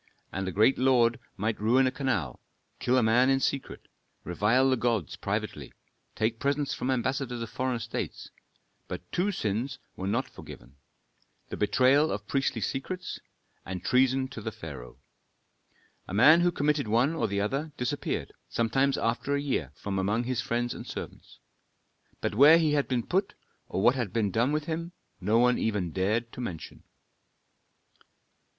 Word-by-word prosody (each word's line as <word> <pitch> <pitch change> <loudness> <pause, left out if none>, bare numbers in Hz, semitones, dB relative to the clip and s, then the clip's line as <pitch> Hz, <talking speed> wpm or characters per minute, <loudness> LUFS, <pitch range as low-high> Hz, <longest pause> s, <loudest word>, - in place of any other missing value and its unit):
A 95 -1 -2
great 110 +8 +3
lord 125 -3 +3 0.2
might 110 +2 -2
ruin 125 +5 +4
a 130 - +2
canal, 110 - -2 0.4
kill 125 +1 +2
a 125 - +4
man 120 +4 +4
in 135 0 +3
secret, 135 0 -3 0.4
revile 110 +9 +2
the - - +4
gods 115 - -1
privately, - - -4 0.4
take 110 +2 0
presents 140 0 0
from 125 - -3
ambassadors 130 -1 -1
of 110 - -8
foreign 130 +1 -1
states, - - -5 0.6
but 90 - -7
two 190 +4 +1
sins 120 - -2 0.2
were 95 - -4
not 115 +6 0
forgiven, 70 - -12 0.7
the - - -4
betrayal 130 +8 +3
of 105 +1 -4
priestly 135 -2 -1
secrets, 180 - -4 0.4
and 90 -1 -6
treason 130 +1 +3
to - - -8
the - - -4
pharaoh. 60 0 -9 1.1
A 95 - -5
man 155 +10 +7
who 175 0 +3
committed 145 -4 0
one 120 +8 +2
or 165 - 0
the 100 0 -1
other 135 +10 -2
disappeared, 125 -2 -3 0.2
sometimes 135 +4 +1
after 120 +5 0
a - - 0
year, 130 - -2
from 95 +3 -3
among 105 +5 0
his 125 0 -1
friends 120 0 -1
and - - -9
servants. - - -8 0.8
But - - -1
where 145 +8 +8
he 155 -3 +2
had 145 -1 +1
been 125 -3 -1
put 195 +3 0 0.3
or 95 - -1
what 120 - +6
had 120 -7 -3
been 105 -2 0
done 120 +6 +2
with 150 0 -1
him, 165 +2 -4 0.3
no 105 +4 +2
one 125 +1 +4
even 105 -6 -1
dared 105 +7 0
to - - -7
mention. 85 -10 -7
125 Hz, 160 wpm, -28 LUFS, 105-135 Hz, 1.1 s, where